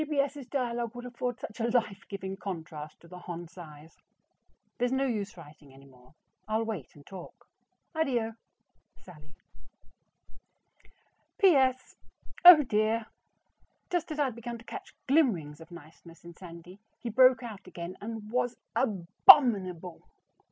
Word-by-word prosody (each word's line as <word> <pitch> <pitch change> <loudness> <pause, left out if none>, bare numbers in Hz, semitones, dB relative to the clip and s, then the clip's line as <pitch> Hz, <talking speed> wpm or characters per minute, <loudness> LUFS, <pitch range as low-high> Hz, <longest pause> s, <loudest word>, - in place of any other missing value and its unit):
G. - - -1
B. 300 -1 -4
S.'s 280 -2 -1
dialogue 240 -4 -2
would 245 0 -8
afford 245 0 -4
such 215 -2 -9
a 230 +1 0
life 220 -5 -1
giving 190 -1 -5
contrast 160 -6 -7
to 170 - -16
the 180 +1 -11
Hon. 175 -1 -7
Cy's. 160 -3 -13 0.8
There's 245 0 +1
no 265 +1 +1
use 210 -6 -3
writing 150 -4 -15
any 135 +1 -16
more; 130 +2 -21 0.3
I'll 220 +1 0
wait 215 - -6
and 145 -1 -16
talk. 190 -3 -12 0.5
ADDIO. 245 -8 0 0.7
SALLIE. 155 -3 -16 2.0
P.S. 265 -9 +3 0.5
Oh 350 -4 +11
dear! 220 -1 0 0.9
just 350 -2 -1
as 305 - -4
I 295 - +2
had 260 -5 -2
begun 235 0 -6
to 230 - -16
catch - - -9
glimmerings 190 - +1
of 165 - -13
niceness 165 0 -14
in 170 0 -11
Sandy, 175 +2 -12 0.2
he 240 - -6
broke 255 +2 +5
out 215 -5 -9
again 175 0 -7
and 220 +1 -6
was 245 0 -1 0.2
ABOMINABLE. 195 - +4
215 Hz, 145 wpm, -29 LUFS, 170-250 Hz, 2.0 s, Oh